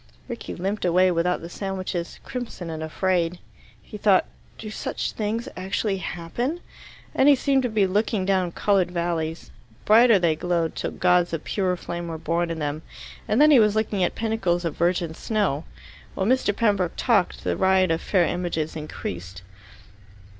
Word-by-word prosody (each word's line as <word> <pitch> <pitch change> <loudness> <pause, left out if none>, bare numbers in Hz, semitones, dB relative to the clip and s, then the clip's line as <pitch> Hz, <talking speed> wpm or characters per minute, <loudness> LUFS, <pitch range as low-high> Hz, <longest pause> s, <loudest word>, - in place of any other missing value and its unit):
Rickie 240 -2 -6
limped 195 +4 -3
away 185 +1 +4
without 175 +1 0
the 165 - -7
sandwiches, 185 -2 -4
crimson 235 -9 -6
and 160 -1 -5
afraid. 175 +1 0 0.5
He 210 - -10
thought, 200 -2 +4 0.3
"Do 215 -1 -7
such - - -3
things 220 +2 -3
actually 195 +2 -1
happen?" 190 - -3 0.5
and 270 - +5
he 285 - +7
seemed 270 0 +2
to 250 - -1
be 215 -3 +2
looking 205 +1 0
down 185 -2 +1
coloured 195 -4 +2
valleys. 170 -2 -3 0.3
Brighter 225 +1 +7
they 170 -4 +2
glowed, 170 0 -1
till - - -2
gods 180 -1 +2
of 160 - -3
pure 185 -3 -1
flame 170 0 -5
were 165 -1 -4
born 170 +2 -1
in 165 - -3
them, 150 0 -3 0.5
and 215 - +2
then 305 +1 +7
he 275 - +8
was 210 -1 +4
looking 210 -3 0
at 175 - 0
pinnacles 195 -6 0
of 165 - -2
virgin 170 -1 0
snow. 185 -6 -1 0.5
While 190 - -1
Mr. 255 -1 +2
Pembroke 200 -6 +1
talked, 220 -7 +1
the - - 0
riot 190 -2 +3
of 165 - 0
fair 185 -4 +2
images 170 -3 -2
increased. 95 - -6
185 Hz, 170 wpm, -24 LUFS, 170-210 Hz, 0.5 s, he